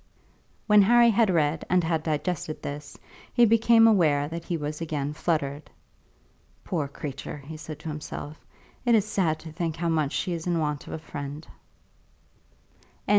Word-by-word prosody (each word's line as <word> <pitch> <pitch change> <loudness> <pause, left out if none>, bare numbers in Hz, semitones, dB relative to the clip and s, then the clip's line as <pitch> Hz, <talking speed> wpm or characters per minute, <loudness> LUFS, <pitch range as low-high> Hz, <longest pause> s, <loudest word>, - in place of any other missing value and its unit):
When 210 -1 +6
Harry 235 +3 +6
had 225 0 +3
read 155 -3 +1
and 180 0 +3
had 160 -1 0
digested 155 0 -3
this, 145 0 -6 0.3
he 240 -1 +5
became 230 +1 +5
aware 155 -10 +4
that 165 0 -6
he 170 - -2
was 150 +1 -5
again 150 -3 -2
fluttered. 150 -3 -2 0.9
"Poor 160 -7 -2
creature!" 140 0 -6
he 145 +3 -9
said 155 -1 -8
to 160 - -6
himself; 150 0 -7 0.4
"it 240 -2 +4
is 215 -2 +3
sad 180 -7 0
to 160 - -9
think 160 0 -3
how 170 0 -1
much 155 -3 0
she 180 - -1
is 165 0 -5
in 175 -1 +1
want 150 -2 -2
of - - -7
a - - -3
friend." 145 -1 -7
160 Hz, 165 wpm, -26 LUFS, 150-180 Hz, 0.9 s, When